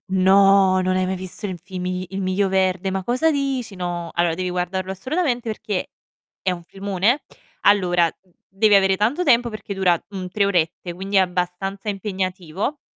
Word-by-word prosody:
No! 190 Hz, 0 st, +5 dB
Non 185 Hz, 0 st, +1 dB
hai 185 Hz, 0 st, +1 dB
mai 190 Hz, 0 st, -2 dB
visto 185 Hz, +3 st, -7 dB
il 185 Hz, -2 st, -5 dB
fimi 185 Hz, -1 st, -4 dB
Il 195 Hz, 0 st, -3 dB
Miglio 190 Hz, +1 st, +1 dB
Verde, 190 Hz, 0 st, +1 dB
ma 190 Hz, -1 st, -3 dB
cosa 255 Hz, +7 st, +2 dB
dici? 270 Hz, -7 st, -2 dB
No, 175 Hz, -2 st, -4 dB
allora 170 Hz, -1 st, +2 dB
devi 185 Hz, +1 st, -3 dB
guardarlo 180 Hz, +1 st, -2 dB
assolutamente 245 Hz, -, -1 dB
perché 210 Hz, -3 st, -3 dB, 0.5 s
è 185 Hz, -, +1 dB
un 175 Hz, -1 st, -6 dB
filmone. 200 Hz, -, 0 dB, 0.4 s
Allora 175 Hz, -4 st, +4 dB
d 190 Hz, -, -33 dB, 0.2 s
devi 205 Hz, +2 st, +3 dB
avere 195 Hz, -1 st, +4 dB
tanto 240 Hz, -, +1 dB
tempo 240 Hz, -4 st, +4 dB
perché 205 Hz, -2 st, -6 dB
dura 180 Hz, -3 st, +2 dB
un 185 Hz, -2 st, -5 dB
3 200 Hz, +1 st, +1 dB
orette, 175 Hz, -2 st, 0 dB
quindi 195 Hz, +2 st, -3 dB
è -, -, +7 dB
abbastanza 185 Hz, +2 st, -2 dB
impegnativo 190 Hz, -, -3 dB
190 Hz, 170 wpm, -22 LUFS, 180-205 Hz, 0.5 s, è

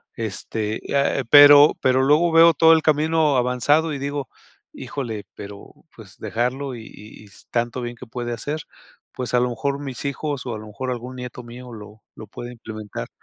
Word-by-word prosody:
Este, 110 Hz, 0 st, -4 dB
eh, 140 Hz, -1 st, +1 dB
pero 145 Hz, 0 st, +8 dB
pero 130 Hz, 0 st, +3 dB
luego 150 Hz, +5 st, +4 dB
veo 165 Hz, 0 st, +7 dB
todo 160 Hz, +1 st, +6 dB
el 160 Hz, -, +3 dB
camino 155 Hz, -1 st, +2 dB
avanzado 145 Hz, +6 st, +1 dB
y 140 Hz, -, -5 dB
digo: 140 Hz, -1 st, -4 dB, 0.5 s
"Híjole, 115 Hz, -7 st, -6 dB
pero 100 Hz, 0 st, -11 dB, 0.2 s
pues -, -, -15 dB
dejarlo 125 Hz, +3 st, -3 dB
y 115 Hz, -, -9 dB
y 105 Hz, +1 st, -14 dB
y -, -, -16 dB
s 100 Hz, -, -17 dB
tanto 120 Hz, +1 st, -1 dB
bien 120 Hz, 0 st, -5 dB
que 125 Hz, -, -11 dB
puede 120 Hz, +1 st, -5 dB
hacer, 145 Hz, +6 st, -5 dB, 0.5 s
pues 125 Hz, -2 st, -5 dB
a 125 Hz, -, +4 dB
lo 125 Hz, 0 st, +1 dB
mejor 140 Hz, +4 st, -3 dB
mis 135 Hz, -4 st, -7 dB
hijos 140 Hz, -1 st, -3 dB
o 120 Hz, -3 st, -4 dB
a -, -, -7 dB
lo 110 Hz, -, -11 dB
mejor 125 Hz, +5 st, -5 dB
algún 125 Hz, +1 st, -6 dB
nieto 125 Hz, 0 st, -7 dB
mío 120 Hz, +1 st, -11 dB
lo 105 Hz, 0 st, -12 dB
lo 110 Hz, -, -11 dB
puede 120 Hz, +4 st, -9 dB
implementar". 110 Hz, -, -8 dB
125 Hz, 190 wpm, -22 LUFS, 115-145 Hz, 0.5 s, pero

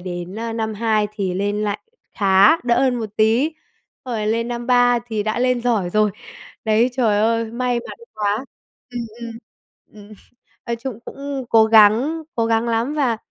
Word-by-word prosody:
đến, 175 Hz, +1 st, -6 dB
ơ, 230 Hz, 0 st, -4 dB
năm 220 Hz, -1 st, -3 dB
2 215 Hz, -1 st, +1 dB
thì 195 Hz, -4 st, -3 dB
lên 205 Hz, +2 st, -1 dB
lại 205 Hz, 0 st, -1 dB, 0.4 s
khá, 195 Hz, +7 st, +5 dB
đỡ 240 Hz, -1 st, +2 dB
hơn 260 Hz, -2 st, +2 dB
một 220 Hz, -3 st, -4 dB
tí, 225 Hz, +8 st, +3 dB, 0.5 s
xong 245 Hz, -2 st, -4 dB
rồi 210 Hz, -1 st, -2 dB
lên 230 Hz, +2 st, 0 dB
năm 240 Hz, 0 st, -4 dB
3 245 Hz, -1 st, +4 dB
thì 220 Hz, -3 st, -2 dB
đã 215 Hz, +2 st, -2 dB
lên 250 Hz, 0 st, +1 dB
giỏi 215 Hz, -8 st, 0 dB
rồi. 215 Hz, +1 st, +2 dB, 0.5 s
Đấy, 220 Hz, +3 st, +3 dB
trời 225 Hz, -5 st, +1 dB
ơi, 230 Hz, +1 st, +2 dB
may 245 Hz, 0 st, -1 dB
mắn -, -, -9 dB, 0.2 s
quá. 210 Hz, +3 st, -1 dB, 0.5 s
Ừm, 245 Hz, -, -4 dB, 0.2 s
ừm, 235 Hz, -1 st, -6 dB, 0.8 s
ừm, -, -, -14 dB, 0.5 s
nói 235 Hz, -1 st, -2 dB
chung 235 Hz, -2 st, -7 dB
cũng 275 Hz, -1 st, -6 dB
cố 225 Hz, -1 st, +6 dB
gắng 225 Hz, +9 st, +5 dB
cố 230 Hz, -1 st, 0 dB
gắng 225 Hz, +1 st, +1 dB
lắm, 230 Hz, +5 st, 0 dB
và 265 Hz, -7 st, +1 dB
225 Hz, 180 wpm, -20 LUFS, 210-245 Hz, 0.8 s, cố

